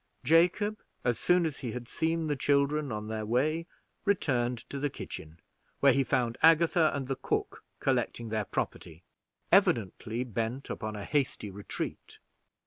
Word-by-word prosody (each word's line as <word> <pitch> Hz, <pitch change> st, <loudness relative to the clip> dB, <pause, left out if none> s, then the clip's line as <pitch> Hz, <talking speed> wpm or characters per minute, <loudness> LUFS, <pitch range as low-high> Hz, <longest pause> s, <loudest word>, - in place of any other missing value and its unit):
Jacob, 180 Hz, -, +3 dB, 0.2 s
as 120 Hz, -1 st, +1 dB
soon 175 Hz, -1 st, +3 dB
as 155 Hz, -4 st, -3 dB
he 120 Hz, -5 st, -4 dB
had 120 Hz, -1 st, -6 dB
seen 165 Hz, +3 st, 0 dB
the 150 Hz, -1 st, 0 dB
children 140 Hz, +1 st, +1 dB
on 105 Hz, 0 st, -4 dB
their 110 Hz, 0 st, -3 dB
way, 150 Hz, +9 st, 0 dB, 0.4 s
returned 125 Hz, -, +1 dB
to 140 Hz, +4 st, -7 dB
the 145 Hz, +1 st, 0 dB
kitchen, 80 Hz, -, -8 dB, 0.4 s
where 140 Hz, -2 st, +6 dB
he 135 Hz, -, +3 dB
found 125 Hz, -2 st, 0 dB
Agatha 165 Hz, 0 st, +5 dB
and 135 Hz, -2 st, -3 dB
the 135 Hz, -, -1 dB
cook -, -, -2 dB, 0.2 s
collecting 115 Hz, -1 st, 0 dB
their 110 Hz, -1 st, -1 dB
property, 85 Hz, -2 st, -4 dB, 0.5 s
evidently 115 Hz, +2 st, +2 dB
bent 115 Hz, +3 st, -3 dB
upon 110 Hz, -1 st, -4 dB
a 100 Hz, -1 st, -5 dB
hasty 135 Hz, -8 st, -1 dB
retreat. 100 Hz, +1 st, -6 dB
130 Hz, 150 wpm, -30 LUFS, 110-155 Hz, 0.5 s, where